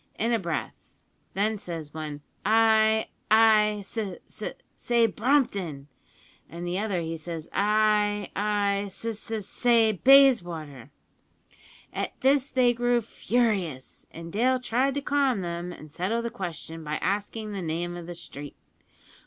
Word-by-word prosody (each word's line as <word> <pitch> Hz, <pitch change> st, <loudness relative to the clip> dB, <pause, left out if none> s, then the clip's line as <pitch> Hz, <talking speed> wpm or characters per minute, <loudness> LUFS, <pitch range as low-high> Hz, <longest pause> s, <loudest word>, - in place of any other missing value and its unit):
in 230 Hz, +2 st, +1 dB
a 230 Hz, -, +2 dB
breath; 170 Hz, -4 st, -5 dB, 0.4 s
then 210 Hz, +2 st, +1 dB
says 165 Hz, -5 st, -7 dB
one, 150 Hz, -2 st, -6 dB, 0.2 s
`I 220 Hz, 0 st, +4 dB, 0.2 s
I 215 Hz, -1 st, +5 dB
s 195 Hz, -, -11 dB
s 205 Hz, -5 st, -6 dB, 0.3 s
say 235 Hz, -1 st, +2 dB
Brompton!' 200 Hz, -, 0 dB, 0.6 s
an' 170 Hz, +3 st, -7 dB
the 175 Hz, +2 st, -2 dB
other, 200 Hz, -5 st, -1 dB
he 165 Hz, 0 st, -4 dB
says, 165 Hz, 0 st, -7 dB
`I 210 Hz, 0 st, +2 dB
I 205 Hz, -1 st, +1 dB
s 200 Hz, -, -10 dB
s 220 Hz, -1 st, -4 dB
say 230 Hz, -2 st, +3 dB
Bayswater!' 175 Hz, -, +4 dB, 1.0 s
"At -, -, -4 dB
this 275 Hz, +1 st, +3 dB
they 250 Hz, -2 st, +3 dB
grew 240 Hz, 0 st, +2 dB
furious, 205 Hz, -, -1 dB
and 165 Hz, 0 st, -10 dB
Dale 255 Hz, +4 st, +2 dB
tried 255 Hz, +3 st, 0 dB
to 285 Hz, -, -1 dB
calm 275 Hz, -6 st, +1 dB
them 175 Hz, 0 st, -4 dB
and 155 Hz, -3 st, -11 dB
settle 205 Hz, +9 st, -1 dB
the 235 Hz, -, -3 dB
question 165 Hz, -6 st, -6 dB
by 150 Hz, 0 st, -3 dB
asking 210 Hz, +4 st, -2 dB
the 200 Hz, -2 st, -4 dB
name 175 Hz, +1 st, -3 dB
of 175 Hz, -1 st, -8 dB
the 175 Hz, -, -6 dB
street. 145 Hz, -3 st, -9 dB
205 Hz, 140 wpm, -27 LUFS, 170-230 Hz, 1.0 s, I